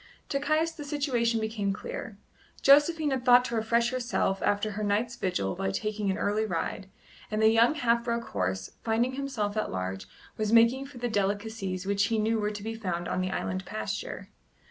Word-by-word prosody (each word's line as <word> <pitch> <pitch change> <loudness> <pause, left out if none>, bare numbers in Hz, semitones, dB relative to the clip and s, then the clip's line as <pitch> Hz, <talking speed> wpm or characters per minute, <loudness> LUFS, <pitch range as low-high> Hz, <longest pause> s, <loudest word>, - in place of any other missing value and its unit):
To 275 - 0
Caius 310 +3 +1
the 315 -2 -8
situation 255 -6 0
became 215 -2 -1
clear. 485 - -7 0.5
Josephine 295 +2 +5
had 260 -2 -1
thought 250 0 +6
to 235 - -3
refresh 230 +2 +2
herself 240 -6 -1
after 205 +1 +1
her 210 +1 -4
night's 215 +4 0
vigil 100 - -1
by 95 - -2
taking 210 - -2
an 190 - 0
early 210 +1 0
ride, 190 0 -3 0.4
and 215 - -1
the 220 0 +6
young 230 +6 +4
half 235 -4 +2
broken 235 -1 -1
horse, 95 +1 -2
finding 230 +3 +1
himself 260 -7 -2
at 215 - -1
large, 95 +1 -4 0.3
was 215 -1 -1
making 235 +4 +5
for 275 -2 -13
the 245 0 -2
delicacies 205 -2 -2
which 200 0 +2
he 225 +2 0
knew 220 +1 +1
were 210 0 0
to 205 -1 -7
be 225 +1 -3
found 180 -6 -3
on 185 - -1
the 185 - -1
island 95 - -2
pasture. - - -5
220 Hz, 190 wpm, -28 LUFS, 200-245 Hz, 0.5 s, thought